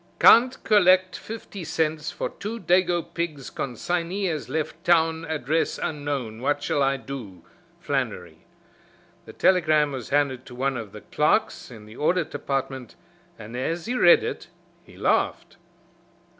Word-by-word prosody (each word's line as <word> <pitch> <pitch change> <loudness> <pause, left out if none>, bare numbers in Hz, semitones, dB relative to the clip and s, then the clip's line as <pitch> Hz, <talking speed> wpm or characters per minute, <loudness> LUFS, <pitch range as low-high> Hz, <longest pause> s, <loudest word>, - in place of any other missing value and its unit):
"Can't 250 +3 +6
collect 185 -3 +4
fifty 215 -4 -8
cents 160 -1 -1
for - - -4
two 220 +3 -6
dago 175 -1 +2
pigs 155 -6 -4
consignee 175 - -2
has 160 -5 -3
left 160 +1 -3
town 165 -1 +2
address 155 0 -1
unknown 140 -7 -4
what 145 +2 0
shall 145 - 0
I 135 0 +2
do? 110 -11 -9 0.3
Flannery." - - -3 0.8
The - - -11
telegram 155 -5 +3
was 130 -4 -6
handed 140 -3 +1
to 125 - -10
one 135 +1 -1
of 110 -4 -6
the - - -10
clerks - - 0
in 110 -4 -12
the 110 +2 -13
Audit 170 +2 0
Department, 135 -3 -4 0.4
and 110 +1 -9
as 165 +7 -2
he 240 - -2
read 175 -9 +6
it - - -5 0.4
he - - -17
laughed. - - 0
155 Hz, 145 wpm, -25 LUFS, 135-175 Hz, 0.8 s, Can't